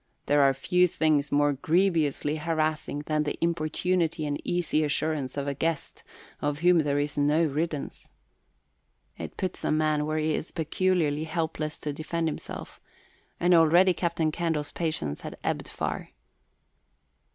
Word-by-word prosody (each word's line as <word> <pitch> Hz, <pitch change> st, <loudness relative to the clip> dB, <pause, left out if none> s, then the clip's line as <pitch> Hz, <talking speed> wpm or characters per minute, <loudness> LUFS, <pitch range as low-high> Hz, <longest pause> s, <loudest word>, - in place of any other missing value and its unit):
There 145 Hz, 0 st, +4 dB
are 135 Hz, -1 st, +6 dB
few 180 Hz, +7 st, +3 dB
things 155 Hz, -3 st, +1 dB
more 145 Hz, 0 st, +3 dB
grievously 155 Hz, -1 st, +1 dB
harassing 155 Hz, -2 st, -1 dB
than 155 Hz, -1 st, +1 dB
the 150 Hz, -1 st, -2 dB
importunity 165 Hz, 0 st, 0 dB
and 145 Hz, -1 st, -2 dB
easy 170 Hz, -3 st, 0 dB
assurance 150 Hz, -2 st, -1 dB
of 140 Hz, 0 st, -2 dB
a 140 Hz, -, 0 dB
guest 160 Hz, +2 st, -3 dB, 0.4 s
of 145 Hz, 0 st, -1 dB
whom 180 Hz, -1 st, +6 dB
there 145 Hz, -2 st, +1 dB
is 145 Hz, 0 st, -1 dB
no 150 Hz, +3 st, +3 dB
riddance. 155 Hz, 0 st, -3 dB, 1.1 s
It -, -, -7 dB
puts 185 Hz, -, -3 dB
a -, -, 0 dB
man 155 Hz, -1 st, +1 dB
where 155 Hz, 0 st, -1 dB
he 155 Hz, 0 st, +1 dB
is 155 Hz, -, -3 dB
peculiarly 160 Hz, -2 st, 0 dB
helpless 160 Hz, -1 st, -3 dB
to 150 Hz, -, -3 dB
defend 165 Hz, +2 st, -2 dB
himself, 155 Hz, -, -6 dB, 0.6 s
and 175 Hz, +1 st, +4 dB
already 175 Hz, +3 st, +6 dB
Captain 170 Hz, -3 st, 0 dB
Candle's 160 Hz, -3 st, -2 dB
patience 155 Hz, -, -2 dB
had -, -, -7 dB
ebbed -, -, -2 dB
far. -, -, -4 dB
155 Hz, 145 wpm, -27 LUFS, 145-165 Hz, 1.1 s, are